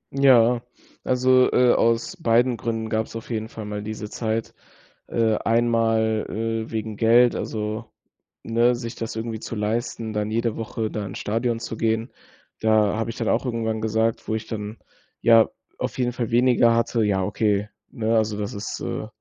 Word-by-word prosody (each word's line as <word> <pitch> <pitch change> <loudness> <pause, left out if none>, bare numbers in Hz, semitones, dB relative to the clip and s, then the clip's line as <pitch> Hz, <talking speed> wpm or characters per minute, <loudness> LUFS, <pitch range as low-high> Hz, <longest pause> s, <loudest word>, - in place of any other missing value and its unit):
Ja, 125 -3 +5 0.4
also, 130 0 +4
äh, 125 -1 +5
aus 115 +11 +1
beiden 120 -4 +2
Gründen 115 -1 -3
gab's 110 +1 -2
auf 115 +2 -7
jeden 110 0 -3
Fall 110 - -8
mal 105 0 -4
diese 105 0 -6
Zeit. 110 -1 -2 0.5
Äh, 110 -2 +1
einmal, 115 -1 +1
äh, 115 0 -3
wegen 110 -2 -4
Geld, 120 +2 +5
also, 110 +1 -3 0.6
ne, 120 +2 +2
sich 115 -1 -6
das 115 -1 -5
irgendwie 110 0 -4
zu 115 - -6
leisten, 110 +1 -2
dann 105 0 -1
jede 115 0 0
Woche 110 -1 -3
da 105 - -3
ins 95 - -7
Stadion 115 +2 -1
zu 115 - -6
gehen. 115 +2 0 0.5
Da 110 -2 +3
habe 115 +1 -2
ich 115 - -5
dann - - -2
auch - - +1
irgendwann 110 -3 -2
gesagt, 110 +1 0
wo 110 - 0
ich 110 0 -4
dann, 105 0 -5 0.4
ja, 115 -1 +6 0.3
auf - - -3
jeden 125 -1 0
Fall 120 -2 -3
weniger 120 -1 +4
hatte 115 0 +1
ja 100 -2 +1
okay, 105 +1 0 0.2
'ne, 115 -2 0
also 110 -1 0
das 105 +4 -4
ist 100 -1 -5
äh, - - -4
115 Hz, 175 wpm, -23 LUFS, 110-115 Hz, 0.6 s, ja